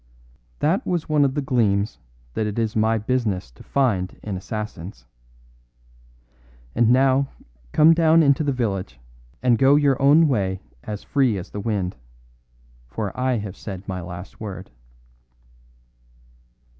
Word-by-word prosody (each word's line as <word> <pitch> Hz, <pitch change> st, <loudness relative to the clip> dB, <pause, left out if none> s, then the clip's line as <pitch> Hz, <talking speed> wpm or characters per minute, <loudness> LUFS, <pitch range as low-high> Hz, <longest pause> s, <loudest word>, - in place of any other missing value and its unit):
That 165 Hz, +7 st, +2 dB
was 175 Hz, -3 st, -2 dB
one 150 Hz, -2 st, +3 dB
of 135 Hz, -1 st, +1 dB
the 145 Hz, -, -1 dB
gleams 105 Hz, -, +1 dB, 0.3 s
that 110 Hz, -, -1 dB
it 105 Hz, -, -4 dB
is 110 Hz, -2 st, -1 dB
my 110 Hz, +1 st, +2 dB
business 105 Hz, -, -1 dB
to -, -, -17 dB
find 105 Hz, -10 st, 0 dB
in 105 Hz, -3 st, -4 dB
assassins. 95 Hz, -, -6 dB, 1.7 s
And 115 Hz, 0 st, +3 dB
now 135 Hz, +2 st, +4 dB, 0.4 s
come 160 Hz, +2 st, +6 dB
down 165 Hz, 0 st, +5 dB
into 140 Hz, +1 st, +3 dB
the 145 Hz, -, +1 dB
village, 95 Hz, -, -3 dB, 0.4 s
and 120 Hz, -3 st, +3 dB
go 135 Hz, +1 st, +6 dB
your 140 Hz, -2 st, +2 dB
own 150 Hz, +4 st, +6 dB
way 95 Hz, -8 st, 0 dB, 0.2 s
as 105 Hz, -1 st, -6 dB
free 130 Hz, -7 st, +1 dB
as 95 Hz, +1 st, -8 dB
the 105 Hz, -, -5 dB
wind; 100 Hz, -4 st, -2 dB, 0.9 s
for 100 Hz, -, -4 dB
I 130 Hz, -1 st, 0 dB
have 100 Hz, -3 st, -5 dB
said 95 Hz, -2 st, -8 dB
my 95 Hz, -1 st, -4 dB
last 90 Hz, +2 st, -9 dB
word." 95 Hz, -3 st, -7 dB
110 Hz, 140 wpm, -23 LUFS, 95-135 Hz, 1.7 s, come